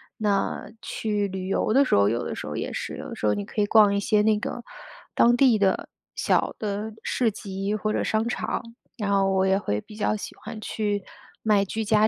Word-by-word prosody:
那 205 -2 -1
去 210 -2 -1
旅 190 -1 -5
游 205 - +1
的 275 +3 +6
时 - - -1
候 100 0 +5
有 120 +3 0
的 - - -4
时 - - -6
候 - - -4
也 - - -3
是， - - -4
有 - - -7
的 - - -6
时 - - -3
候 105 - +4
你 100 0 -2
可 210 - -3
以 - - +3
逛 205 -1 +6
一 200 - +1
些 210 +1 +2
那 215 0 +3
个 240 +3 -5 0.5
当 240 +1 +5
地 245 -4 +5
的 195 -1 +1 0.3
小 - - +1
的 210 +1 -3
市 245 -3 +1
集 195 0 -3
或 215 0 -1
者 - - 0
商 220 +1 0
场， 245 - -2 0.3
然 205 -3 -2
后 195 -1 +3
我 190 0 +3
也 190 0 +3
会 105 - -2
比 210 - -13
较 215 0 +1
喜 210 - -6
欢 220 0 -8
去 205 -2 -2 0.4
卖 210 -2 +3
居 220 +3 -3
家 215 0 +4
210 Hz, 245 characters per minute, -25 LUFS, 195-220 Hz, 0.5 s, 的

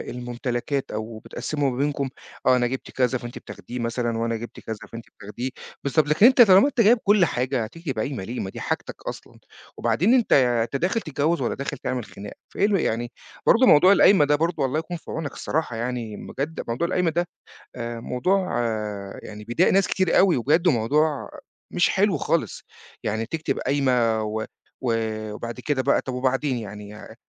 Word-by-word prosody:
الممتلكات، 120 +2 -3
أو 110 +1 -5
بتقسّموا 145 +4 -2
ما 125 - -5
بينكم 140 -1 -1 0.4
آه، 130 - +6
أنا 120 -1 +2
جِبت 130 +2 -5
كذا 130 0 +1
فأنتِ 120 0 -8
بتاخديه 125 - -8
مثلًا 115 0 -1
وأنا 115 0 -1
جِبت 120 +1 -8
كذا 110 -1 -6
فأنتِ 115 0 -7 0.2
بتاخديه، 110 +5 -5 0.3
بالضبط 140 +2 +2
لكن 150 +8 +5
أنت 255 0 +7
طالما 195 +2 +7
أنت 265 -5 +1
جايب 230 +4 +6
كُلّ 205 -2 +5
حاجة 130 -3 -1
هتكتب 135 +2 -5
قايمة 120 -2 -3
ليه، 120 +6 -5
ما 95 - -3
دي - - -8
حاجتك - - -3
أصلًا، - - -8 0.4
وبعدين 120 - +2
أنت 250 -3 +3
أنت 120 -2 +3
داخل 185 +10 0
تتجوز 155 0 0
والَّا 120 - -1
داخل 140 - -4
تعمل 125 -3 -3
خناقة 100 0 -10 0.2
فإيه 200 - +2
ال 205 -2 +2
يعني، 120 -3 -1 0.4
برضه 255 +3 +6
موضوع 180 +2 +7
القايمة 195 -5 +6
ده 145 +1 +3
برضه 165 -2 0
الله 135 +4 0
يكون 175 +2 -5
في - - -11
عونك 155 -2 -4
الصراحة 155 -6 -2
يعني 120 -2 -3
بجد 150 +4 -5
موضوع 120 +9 -1
القايمة 180 -2 +1
ده 175 +2 0 0.5
آآ 120 -1 -5
موضوع 185 +12 0 0.7
يعني 105 0 -9
بيضايق 120 - +2
ناس 195 0 +4
كتير 185 -3 +2
أوي، 190 -3 +5
وبجد 150 +8 +2
وموضوع 150 +2 +2 0.4
مش - - +3
حلو - - +2
خالص - - -1 0.4
يعني 110 +2 -2
تكتب 160 +5 -2
قايمة، 125 -5 +1
و 110 +1 -3 0.4
و 120 -3 0 0.4
وبعد 115 +3 -6
كده 130 0 0
بقى 140 - +3
طَب 130 - -6
وبعدين 130 +1 0
يعني 105 0 -9
130 Hz, 180 wpm, -24 LUFS, 115-160 Hz, 0.7 s, أنت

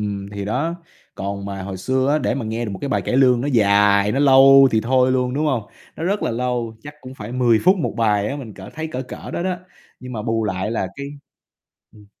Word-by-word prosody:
ừm, 100 -1 -4
thì 100 -1 -5
đó. 135 +11 -1 0.4
Còn 100 0 -5
mà 100 -1 -5
hồi 95 0 -6
xưa 130 +7 0
á, 150 - +3
để 145 - -1
mà 135 -3 -3
nghe 110 +2 -3
được 110 - -4
một 100 - -6
cái 140 - -2
bài - - 0
cải - - -1
lương 125 -3 +4
nó 135 - -2
dài, 100 -2 +4
nó 135 - 0
lâu 135 -1 +7
thì 110 - +2
thôi 130 +2 +2
luôn, 125 -1 0
đúng 150 +2 0
hông? 130 -6 0 0.3
Nó 160 - -4
rất 200 +4 -1
là - - 0
lâu, 120 -1 -2
chắc 145 +1 -10
cũng 130 -1 -10
phải 120 - -8
10 120 -3 +3
phút 185 +3 +5
1 175 - -3
bài 105 -3 +1
á, 140 - -4
mình 120 -8 -9
cỡ 95 - -11
thấy 160 +1 -4
cỡ 130 - -3
cỡ 125 - -9
đó - - -3
đó, 185 -1 -1 0.4
nhưng 125 0 -8
mà 110 -3 -4
bù 115 0 -1
lại 95 0 -2
là 115 -4 -1
cái 140 - -6 0.9
ừm. 105 -1 -18
120 Hz, 255 wpm, -20 LUFS, 105-135 Hz, 0.9 s, lâu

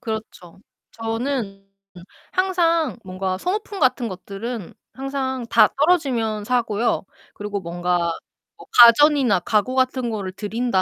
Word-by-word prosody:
그렇죠. 215 -5 -7 0.3
저는 225 -3 -3 0.7
항상 335 -6 +1
뭔가 185 0 -3
소모품 400 - -3
같은 255 -4 +2
것들은 200 +2 -7 0.2
항상 265 -2 -3
다 - - +6
떨어지면 260 -10 +1
사고요. 235 -3 0 0.3
그리고 205 0 -4
뭔가 175 -1 -1 0.5
뭐 - - -13
가전이나 245 -2 +7
가구 215 +7 0
같은 255 -1 +1
거를 200 -4 -4
들인다 210 +1 -1
230 Hz, 255 characters per minute, -22 LUFS, 195-265 Hz, 0.7 s, 가전이나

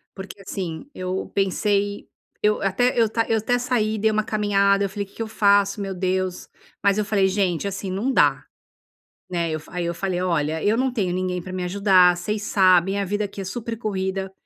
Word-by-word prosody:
porque 195 +1 -9
assim 180 - -6
eu 185 +1 -3
pensei 200 +1 0 0.3
eu 210 0 +2
até 245 +7 +1
eu 230 -1 +4 0.2
eu 225 - +2
até 245 +3 0
saí, 220 -3 0
dei 220 +1 +2
uma 215 0 +1
caminhada 200 -2 +2
eu - - -3
falei 200 +1 -4
que 195 - -23
que - - -7
eu 225 - -2
faço 200 -1 +2
meu 195 -1 -3
Deus, 185 0 -2 0.3
mas 200 0 +3
eu 215 - +2
falei 200 -2 +2
gente 190 -1 0
assim 195 -1 -4
não 220 +8 -1
dá, - - +3 0.8
né, 170 -2 -1
eu 155 - -2
fa 155 - -16
aí 180 -1 -2
eu 170 - -1
falei, 185 -1 -2
"Olha, 160 -3 -1
eu 210 +2 +2
não 260 0 0
tenho 190 -7 -1
ninguém 180 0 -2
pra 185 - -9
me 185 -1 -3
ajudar, 185 -1 +4
vocês 205 +4 -3
sabem, 190 0 +3
a 200 - -1
vida 205 +2 -1
aqui 200 0 -7
é - - -4
super 230 +4 -5
corrida, 190 -3 -3
195 Hz, 205 wpm, -23 LUFS, 185-210 Hz, 0.8 s, eu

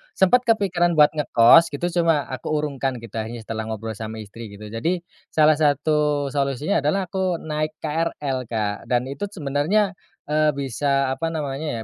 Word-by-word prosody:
sempat 245 +6 +3
kepikiran 180 -6 +2
buat 150 -1 +6
ngekos 150 +1 +5
gitu. 175 +5 -2
Cuma 165 -4 +3
aku 130 - -6
urungkan 140 -3 -2
gitu 115 -1 -6
akhirnya 115 +1 -5
setelah 110 0 -5
ngobrol 110 0 -4
sama 110 +1 -6
istri 110 +3 -10
gitu. 105 +1 -10
Jadi 170 +10 -1 0.2
salah 155 -1 +3
satu 150 -1 +1
solusinya 140 +5 0
adalah 150 +8 0
aku 190 -2 0
naik 155 -1 -3
KRL 150 -5 -2
Kak, 105 -3 -3
dan 125 +2 0
itu 140 +9 -4
sebenarnya, 185 +3 0 0.4
eee, 155 0 +3
bisa 140 0 0
apa 135 +5 -2
namanya 145 -5 -3
145 Hz, 155 wpm, -23 LUFS, 125-165 Hz, 0.4 s, buat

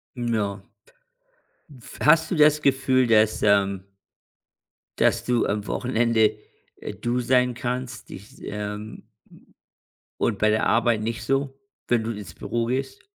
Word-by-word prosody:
Ja. 110 -5 -2 1.2
F 120 - -13
hast 155 +2 +5
du - - 0
das 150 -1 +4
Gefühl, 130 -2 +2
dass, 110 -2 +3
ähm 100 -2 +2 1.1
dass - - +2
du 120 -1 +1
am 105 0 -2
Wochenende, 115 -3 +1 0.4
äh, - - -7
du 120 +1 -2
sein 125 0 +2
kannst? 125 -2 -5
Dich, 100 +3 -12
ähm 105 +1 -6 1.2
und 115 - +1
bei 110 - +3
der 110 +1 +1
Arbeit 115 -1 +2
nicht 115 +2 -4
so, 135 +2 -1 0.3
wenn 120 -2 +2
du 115 - -3
ins 100 -7 -7
Büro 115 -1 -3
gehst? 130 +2 -3
115 Hz, 130 wpm, -24 LUFS, 105-125 Hz, 1.2 s, hast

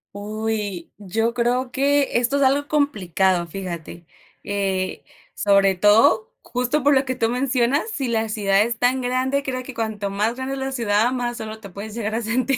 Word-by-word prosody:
Uy, 210 -3 -4
yo 225 +4 -1
creo 245 +1 0
que 280 -1 +2
esto 245 +3 0
es 280 - +2
algo 280 +2 +2
complicado, 190 - +1
fíjate. 170 -1 -7 0.4
Eh, 195 -2 -2 0.3
sobre 200 -1 +3
todo, 210 +3 +4
justo 250 +4 -1
por 290 +1 +5
lo 265 0 +4
que 260 -1 -3
tú 225 -2 +1
mencionas, 255 - +1
si 275 - -2
la 225 -1 0
ciudad 200 -2 +2
es 235 +2 0
tan 250 +2 +2
grande 255 +2 0
creo 255 -2 -4
que 265 - -9
cuanto 220 -3 -3
más 210 +4 0
grande 260 +1 -4
es 275 - -4
la 265 0 -3
ciudad, 230 -2 +1
más 240 -1 -2
solo 220 0 -6
te 200 -3 -11
puedes 205 +3 -8
llegar 220 -2 -3
a 230 - -1
sentir. 250 +4 0
230 Hz, 185 wpm, -22 LUFS, 205-260 Hz, 0.4 s, por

